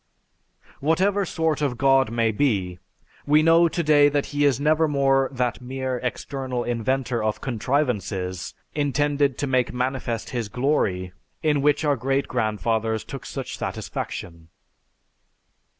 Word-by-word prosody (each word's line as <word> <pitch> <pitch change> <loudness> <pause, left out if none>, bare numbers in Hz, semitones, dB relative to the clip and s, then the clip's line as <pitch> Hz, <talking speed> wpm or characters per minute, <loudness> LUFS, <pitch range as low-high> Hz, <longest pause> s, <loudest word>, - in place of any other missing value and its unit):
Whatever 190 +7 +2
sort 160 -3 -1
of 135 -5 0
God 135 -1 +4
may 115 -1 +1
be, 100 -7 0 0.5
we 150 +1 +5
know 165 +1 +6
today 150 -3 +4
that 145 -1 0
he 145 0 +2
is 140 -3 +3
nevermore 140 -3 +2
that 125 -2 -2
mere 130 0 -3
external 130 0 -3
inventor 120 0 -1
of 110 -1 -1
'contrivances' 110 - -2 0.2
intended 145 -1 +1
to - - -1
make 130 -2 +1
manifest 125 -2 -3
his 120 -4 -3
'glory' 95 -10 0 0.3
in 150 -3 +2
which 150 +2 +2
our 145 -1 +3
great 135 +3 0
grandfathers 110 -1 -1
took - - -8
such - - -6
satisfaction." 85 -2 -5
135 Hz, 125 wpm, -24 LUFS, 115-145 Hz, 0.5 s, know